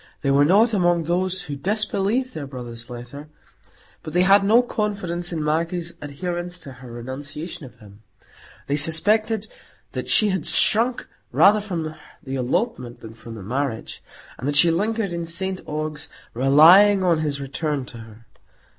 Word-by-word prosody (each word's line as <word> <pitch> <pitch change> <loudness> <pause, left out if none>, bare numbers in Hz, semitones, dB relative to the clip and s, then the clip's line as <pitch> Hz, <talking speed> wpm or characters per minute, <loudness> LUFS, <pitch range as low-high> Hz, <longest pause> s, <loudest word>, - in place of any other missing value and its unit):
They 140 - +1
were 140 +1 +4
not 215 +8 +4
among 175 -4 +2
those 185 +3 -1
who 145 -5 -6
disbelieved 210 - -1
their 145 -3 -6
brother's 120 -2 -9
letter; 125 +5 -9 0.7
but 155 - -9
they 180 +1 +3
had 195 +1 +5
no 225 +5 +4
confidence 200 -7 -3
in 160 -3 -3
Maggie's 165 +2 -1
adherence 175 +4 -5
to 140 - -10
her 125 -2 -11
renunciation 140 +6 -7
of - - -18
him; 105 0 -17 0.6
they 145 - -1
suspected 210 +8 +3 0.4
that - - -5
she 215 - +5
had 190 -5 -1
shrunk 235 +3 +3 0.2
rather 210 +2 +5
from 165 -6 -4 0.3
the 135 - -7
elopement 125 - -2
than 110 0 -10
from 115 0 -11
the 105 - -9
marriage, 125 +2 -4 0.4
and 125 - -4
that 145 - -1
she 165 +4 +6
lingered 205 +2 -1
in 170 -1 -4
St 190 +3 -3
Ogg's, 155 0 -4 0.2
relying 170 - +6
on 170 -3 +2
his 145 -3 -2
return 140 0 -3
to 120 - -9
her. 115 0 -14
165 Hz, 160 wpm, -22 LUFS, 135-190 Hz, 0.7 s, she